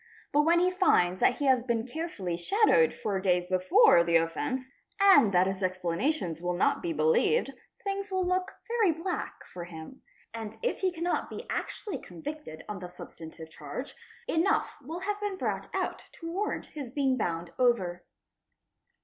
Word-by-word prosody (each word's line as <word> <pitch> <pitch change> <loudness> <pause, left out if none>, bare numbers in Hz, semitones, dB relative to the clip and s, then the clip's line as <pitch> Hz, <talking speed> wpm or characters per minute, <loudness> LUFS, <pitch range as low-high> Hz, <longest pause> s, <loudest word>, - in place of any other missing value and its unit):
But 295 - +5
when 340 +1 +5
he 365 +1 +3
finds 185 - +3
that 245 - +4
he 285 - -2
has 260 -2 +4
been 235 -2 -1
carefully 245 - -4
shadowed 430 - +3
for 200 -2 -2
days 180 -2 +2
before 185 -1 +5
the 170 0 +1
offence 255 - 0 0.3
and 390 - +7
that 180 0 +4
his 190 0 -2
explanations 185 - -1
will 180 0 -1
not 175 - +2
be 345 - -2
believed, 470 +5 +2 0.3
things 395 0 -3
will 375 -1 +1
look 365 +1 0 0.2
very 455 -6 +3
black 365 +2 -4
for 175 -1 -6
him, 165 +8 -10 0.3
and 225 -1 -6
if - - 0
he 375 -1 +1
cannot 345 +1 -2
be - - -7
actually 420 - -4
convicted 300 - -8
on 210 -2 -5
the 180 -1 -7
substantive 160 -2 -11
charge, 155 - -7 0.3
enough 370 -2 +1
will 325 +7 -6
have 415 +1 -2
been 410 -2 -2
brought - - -2
out - - -3
to 330 -1 -7
warrant 410 +4 -2
his 280 -5 -6
being 270 0 +1
bound 170 -7 -2
over. 195 -9 +2
255 Hz, 165 wpm, -29 LUFS, -, 0.3 s, and